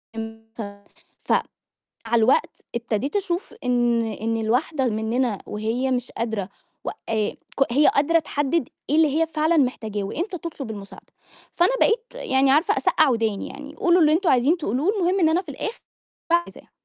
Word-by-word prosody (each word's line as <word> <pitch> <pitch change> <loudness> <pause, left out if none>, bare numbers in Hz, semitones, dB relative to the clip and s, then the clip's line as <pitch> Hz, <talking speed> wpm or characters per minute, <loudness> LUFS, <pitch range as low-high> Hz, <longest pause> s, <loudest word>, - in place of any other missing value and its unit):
إمتي 225 -2 -8 0.4
ف - - -4 0.8
مع 235 - +1
الوقت 235 +3 +2
ابتديت 235 - -2
أشوف 375 -1 -2
إن 240 -2 +2
إن 225 +1 -2
الواحدة 260 +6 0
مننا 225 0 0
وهي 225 +5 -2
مش 250 0 -2
قادرة 220 -4 -3 0.3
و - - -2 0.2
آآ 215 -2 +1 0.3
ك 270 -4 +2
هي 295 +4 +5
قادرة 325 +4 +4
تحدد 290 -1 -1 0.2
إيه 295 - +2
اللي 315 0 +3
هي 325 - +2
فعلًا 315 +1 +1
محتاجاه، 220 -7 0
وإمتى 355 - -3
تطلب 295 -8 -6
المساعدة، 200 -2 -10 0.5
فأنا 350 +6 +3
بقيت 460 +1 +3
يعني 265 - +2
عارفة 300 +5 +3
أسقع 310 -3 +3
وداني 225 -4 0
يعني، 290 +2 -10
قولوا 350 +2 +3
اللي 305 -1 +5
أنتم 340 +1 +2
عايزين 270 +7 +4
تقولوه 290 - 0
المهم 375 0 +1
إن 325 -3 +4
أنا 335 +3 +2
في 350 - -12
الآخر 430 - -5 0.5
باعمل 345 +1 +4
اللي - - -11
عايزاه. - - -17
265 Hz, 165 wpm, -23 LUFS, 225-325 Hz, 0.8 s, هي